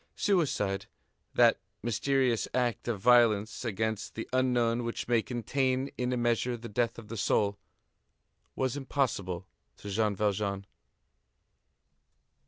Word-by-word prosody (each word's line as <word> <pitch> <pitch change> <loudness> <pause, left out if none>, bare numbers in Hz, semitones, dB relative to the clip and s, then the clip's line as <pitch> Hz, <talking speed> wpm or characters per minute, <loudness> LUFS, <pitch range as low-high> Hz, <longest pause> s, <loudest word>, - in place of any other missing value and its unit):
Suicide, 135 - 0 0.5
that - - +5 0.2
mysterious 125 +1 +1
act 120 -4 0
of 115 -4 -1
violence 110 -2 +4
against 110 -2 -2
the 115 - -5
unknown 120 -2 +2
which 115 0 -4
may 120 -1 +3
contain, 130 +3 -1
in 125 0 -1
a 125 - 0
measure, 120 +1 +1
the 115 +1 -8
death 115 +2 -1
of 115 -2 -10
the 115 - -6
soul, 100 -1 +1 1.0
was 130 -1 -1
impossible 120 -10 -2 0.3
to 100 - -7
Jean 105 0 +1
Valjean. 100 -1 -1
115 Hz, 120 wpm, -30 LUFS, 105-125 Hz, 1.0 s, that